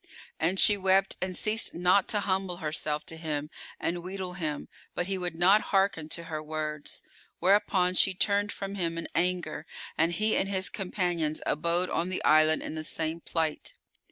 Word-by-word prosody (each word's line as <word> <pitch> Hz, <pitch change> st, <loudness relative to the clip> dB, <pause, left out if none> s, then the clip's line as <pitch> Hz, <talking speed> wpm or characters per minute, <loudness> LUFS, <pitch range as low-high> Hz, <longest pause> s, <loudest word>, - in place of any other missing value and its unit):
And 180 Hz, +4 st, +1 dB
she 210 Hz, -, +6 dB
wept 190 Hz, 0 st, +2 dB
and 185 Hz, -1 st, -2 dB
ceased 220 Hz, +1 st, +1 dB
not 180 Hz, +3 st, +3 dB
to 210 Hz, -, 0 dB
humble 190 Hz, -2 st, -1 dB
herself 150 Hz, -1 st, -2 dB
to 160 Hz, -, -8 dB
him 150 Hz, -2 st, -4 dB, 0.3 s
and 175 Hz, +1 st, -2 dB
wheedle 185 Hz, 0 st, -5 dB
him, 155 Hz, -5 st, -4 dB, 0.3 s
but 175 Hz, -, -1 dB
he 195 Hz, +1 st, -2 dB
would 175 Hz, -2 st, -3 dB
not 190 Hz, +5 st, +5 dB
hearken 195 Hz, -6 st, +1 dB
to 170 Hz, -, -2 dB
her 160 Hz, -2 st, -5 dB
words; 155 Hz, -1 st, -5 dB, 0.3 s
whereupon 190 Hz, -2 st, +3 dB
she 190 Hz, +1 st, +4 dB
turned 205 Hz, +2 st, +1 dB
from 195 Hz, 0 st, -5 dB
him, 170 Hz, -4 st, -2 dB
in 165 Hz, -, -4 dB
anger, 180 Hz, +2 st, -1 dB, 0.3 s
and 165 Hz, +2 st, +3 dB
he 215 Hz, +4 st, +1 dB
and 195 Hz, -, 0 dB
his 190 Hz, -1 st, +1 dB
companions 175 Hz, -5 st, -2 dB
abode 170 Hz, +4 st, 0 dB
on 170 Hz, +2 st, 0 dB
the 185 Hz, -, -3 dB
island 155 Hz, 0 st, +4 dB
in -, -, -5 dB
the 155 Hz, 0 st, -4 dB
same 160 Hz, +1 st, 0 dB
plight. 160 Hz, -3 st, -2 dB
175 Hz, 180 wpm, -28 LUFS, 160-190 Hz, 0.3 s, she